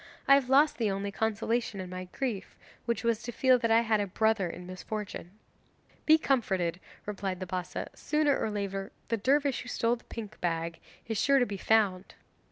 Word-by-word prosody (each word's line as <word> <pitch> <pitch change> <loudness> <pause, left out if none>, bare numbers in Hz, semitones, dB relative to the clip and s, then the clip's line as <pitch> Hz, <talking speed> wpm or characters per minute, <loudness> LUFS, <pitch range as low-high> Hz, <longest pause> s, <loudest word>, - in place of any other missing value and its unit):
I 275 - +8
have 275 -2 +4
lost 285 +2 +4
the 220 -3 +2
only 200 +1 -2
consolation 225 0 -1
in 185 -1 -6
my 185 0 -5
grief, 210 +1 -4 0.3
which 235 -1 -1
was 230 -1 +1
to 240 - -5
feel 255 +1 +4
that 230 -1 0
I 225 +1 +5
had 220 -2 +2
a 205 - 0
brother 220 -1 +1
in 180 +1 -8
misfortune!' 185 0 -6 0.8
'Be 315 0 +8
comforted,' 190 - 0 0.3
replied 195 -3 -3
the 185 - -4
Bassa; 180 0 -4
'sooner 300 -2 +1
or - - -1
later 200 -1 -3 0.2
the 230 - +1
dervish 275 +4 +2
who 250 - -9
stole 240 0 +1
the - - -21
pink 220 -3 -8
bag 165 -1 -2 0.3
is 225 -2 -1
sure 275 0 +4
to 250 - +4
be 200 -3 -5
found. 200 -3 +1
220 Hz, 190 wpm, -30 LUFS, 190-240 Hz, 0.8 s, I